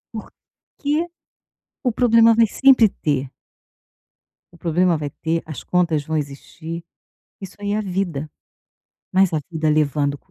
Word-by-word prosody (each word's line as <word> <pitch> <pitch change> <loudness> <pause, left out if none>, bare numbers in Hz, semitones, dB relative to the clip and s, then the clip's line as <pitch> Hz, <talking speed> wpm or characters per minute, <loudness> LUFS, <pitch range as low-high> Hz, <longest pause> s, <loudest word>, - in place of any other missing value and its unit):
Por 215 - -6 0.5
que 290 0 -1 1.0
o - - 0
problema 230 -2 +5
vai 230 -2 +5
sempre 265 -4 +7 0.2
ter. 140 -3 +1 1.3
O - - -16
problema 170 +1 +1
vai 150 -1 -4
ter, 165 +3 -2
as 155 -3 -8
contas 170 -5 +1
vão 160 0 -1
existir. 160 +4 -6 0.6
Isso 195 -1 -9
aí 205 0 -3
é 210 - +1
a 215 - 0
vida. 180 -6 -3 0.8
Mas 190 -2 +3
a 155 - +1
vida 155 -1 0
levando 145 -1 +1
170 Hz, 140 wpm, -21 LUFS, 155-205 Hz, 1.3 s, sempre